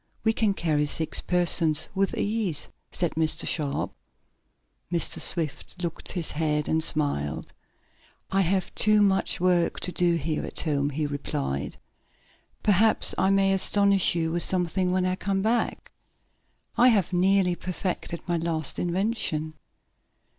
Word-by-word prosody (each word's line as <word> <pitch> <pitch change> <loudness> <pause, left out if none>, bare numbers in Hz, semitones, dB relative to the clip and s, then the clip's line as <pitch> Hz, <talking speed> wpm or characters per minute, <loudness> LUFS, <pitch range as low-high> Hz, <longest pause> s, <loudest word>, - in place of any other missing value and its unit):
We 220 - +2
can 215 -3 +1
carry 150 -4 0
six 155 0 -1
persons 165 -3 +3
with 195 0 -1
ease," 205 -8 -2 0.2
said 175 -2 -1
Mr. 160 -1 -1
Sharp. 145 -4 -1 1.0
Mr. 170 -1 +2
Swift 165 +1 -1
shook 170 -2 -5
his 175 -4 -2
head, 150 -1 -1
and 160 0 +1
smiled. 145 - -1 0.8
"I 195 0 +2
have 185 +1 -1
too 215 -1 +3
much 195 -1 +1
work 175 -1 +1
to 180 - -1
do 175 -1 +1
here 160 -2 -2
at - - -4
home," 145 -3 -1
he 150 +2 -3
replied. 70 - -4 0.9
"Perhaps 215 +2 +3
I 190 - +2
may 195 0 +3
astonish 200 -1 +3
you 165 -1 -1
with 175 +1 -1
something 180 0 +1
when 185 0 0
you 185 0 0
come 195 0 -2
back. 230 +2 -1 0.9
I 245 - +6
have 200 -7 +2
nearly 185 0 +2
perfected 180 -1 -4
my 175 -1 0
latest 160 -3 -2
invention." 175 -4 -1
175 Hz, 140 wpm, -25 LUFS, 155-195 Hz, 1.0 s, I